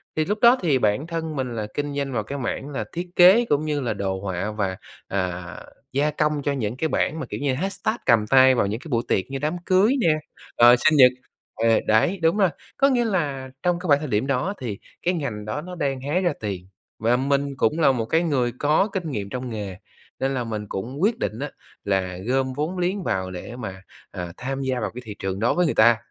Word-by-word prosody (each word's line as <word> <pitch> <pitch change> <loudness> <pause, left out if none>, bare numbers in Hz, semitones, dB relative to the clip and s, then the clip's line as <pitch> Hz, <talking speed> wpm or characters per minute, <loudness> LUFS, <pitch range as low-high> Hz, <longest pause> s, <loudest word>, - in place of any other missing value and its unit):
thì 155 - +1
lúc 210 +4 -1
đó 240 +2 +7
thì 150 -7 +3
bản 110 +8 +1
thân 160 -2 -4
mình 125 -3 -3
là 105 -2 -3
kinh 145 -1 -3
doanh 140 -2 -2
vào 110 - -1
cái 140 +7 -5
mảng 135 +2 -3
là 130 -7 -3
thiết 175 +1 -4
kế 190 +7 +7
cũng 150 -6 +1
như 150 -1 -1
là 120 -3 -1
đồ 95 -2 -2
họa 95 +1 -3
và, 100 -3 -2 0.3
à, 90 -3 -3 0.3
gia 145 +3 +1
công 150 0 0
cho 145 - +1
những 125 -3 -2
cái 160 - 0
bảng 155 0 0
mà - - -4
kiểu - - -4
như 140 -2 0
hashtag 195 - -2
cầm 115 -4 +4
tay 130 0 +6
vào 100 - +2
những 110 +3 -3
cái 160 - -11
buổi 115 -3 +1
tiệc 95 - +1
như 135 - -3
đám 155 +5 -1
cưới 190 +6 +4
nè, 165 -7 +4 0.5
rồi 120 +1 +9
sinh 155 +5 +3
nhật 125 -2 +8 0.4
ờ, 115 0 +3
đấy, 110 - +3
đúng 165 +4 +3
rồi. 195 -4 +4 0.3
Có 275 - +5
nghĩa 245 -3 +2
là 145 -10 -1
trong 175 -1 +1
cái 180 - -6
khoảng 145 -2 +5
thời 155 - -4
điểm 110 +2 0
đó 140 +9 0
thì 110 -6 -4 0.2
cái 180 +2 +1
ngành 120 -10 -4
đó 110 +8 -3
nó 180 +2 -8
đang 135 -5 -2
hái 150 +7 0
ra 175 -4 +1
tiền, 95 -4 -5 0.3
và 115 +3 +2
mình 140 +1 0
cũng 150 +9 +1
là 150 -4 +5
một 120 -4 -1
cái 160 +9 +2
người 130 -7 +1
có 150 +7 +3
kinh 175 -6 -3
nghiệm 100 -5 -4
trong 125 +3 -4
nghề, 100 -5 -5 0.4
nên 135 +1 0
là 125 - -1
mình 110 -2 -4
cũng 125 +10 -5
quyết 215 +4 +2
định 110 - -3
á, 145 +1 -4 0.3
là 95 -2 -1
gom 130 0 +1
vốn 155 +7 -3
liếng 185 +2 -1
vào 95 - -1
để 90 +6 -7
mà, 95 -6 -7 0.3
ờ, 90 -1 -6
tham 135 +1 -4
gia 130 -2 -1
vào 110 - -2
cái 125 - -6
thị 105 - -7
trường 95 0 -3
đó 115 +3 +2
với 180 - +2
người 155 - 0
ta. 115 +1 +6
135 Hz, 245 wpm, -23 LUFS, 110-160 Hz, 0.5 s, rồi